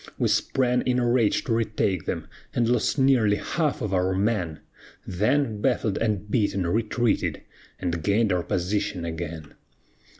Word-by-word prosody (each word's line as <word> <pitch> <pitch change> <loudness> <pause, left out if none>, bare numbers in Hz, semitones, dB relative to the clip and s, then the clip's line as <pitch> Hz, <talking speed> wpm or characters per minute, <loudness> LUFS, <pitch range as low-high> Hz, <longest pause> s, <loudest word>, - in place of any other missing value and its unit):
We - - +1
sprang 125 -1 +1
in 125 -1 0
a 120 -1 +1
rage 120 -3 +2
to 120 - -1
retake 105 -6 0
them, - - -2 0.3
And 120 -1 +2
lost 120 +3 +1
nearly 130 -6 +4
half 150 +3 -1
of 105 -2 -2
our 95 0 +1
men; 95 -6 -1 0.4
Then, 110 +3 0
baffled 115 -5 +1
and 105 -3 -1
beaten, 100 -5 +1
retreated, 110 +5 0 0.4
And 85 -2 -2
gained 100 +5 +2
our 90 - +1
position 90 0 -2
again. 80 -2 -6
105 Hz, 145 wpm, -25 LUFS, 90-120 Hz, 0.4 s, nearly